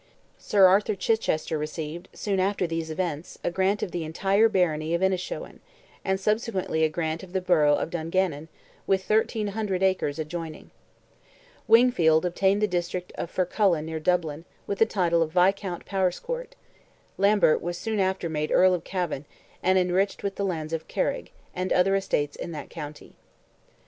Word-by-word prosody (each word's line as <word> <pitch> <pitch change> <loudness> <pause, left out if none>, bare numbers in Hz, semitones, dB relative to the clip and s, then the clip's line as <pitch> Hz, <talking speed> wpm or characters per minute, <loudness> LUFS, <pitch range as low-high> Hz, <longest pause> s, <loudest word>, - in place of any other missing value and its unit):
Sir 200 -2 +4
Arthur 200 +3 +4
Chichester 180 -7 0
received, 155 +2 -5
soon 200 -2 -2
after 190 0 +1
these 165 -1 -3
events, 160 -1 -4
a - - 0
grant 190 +3 +1
of - - -3
the 175 -2 -3
entire 195 +7 +2
barony 165 -5 +1
of 170 - -1
Innishowen, 185 -1 -2 0.4
and 190 0 0
subsequently 205 -6 0
a 160 - +4
grant 160 0 -2
of 190 -1 -12
the 190 - +1
borough 160 -5 +4
of 160 - -3
Dungannon, 165 -2 -1 0.4
with 190 -1 +1
1,300 210 -3 0
acres 185 -6 +1
adjoining; 160 0 -6 1.0
Wingfield 180 -9 +5
obtained 195 +3 +1
the - - +4
district 180 -1 -3
of - - -5
Fercullan 180 -3 +1
near 160 0 -4
Dublin, 160 -2 0 0.2
with 200 - -3
the 225 - +5
title 170 -5 +1
of 160 -1 -1
Viscount 185 0 +1
Powerscourt; 455 - -2 0.6
Lambert 200 -5 +4
was 175 +1 -3
soon 220 +1 -2
after 190 -2 0
made 155 -1 -2
Earl 185 0 +5
of 175 -2 -2
Cavan, 180 -7 -3 0.4
and 185 +1 +3
enriched 185 +3 +1
with 200 -1 -1
the 200 - -3
lands 165 -4 -3
of 160 -1 -3
Carig, - - -2 0.2
and 185 +1 -3
other 195 +2 +3
estates 145 -7 -1
in - - -6
that 150 -2 -8
county. 150 -2 -9
180 Hz, 160 wpm, -26 LUFS, 160-195 Hz, 1.0 s, Wingfield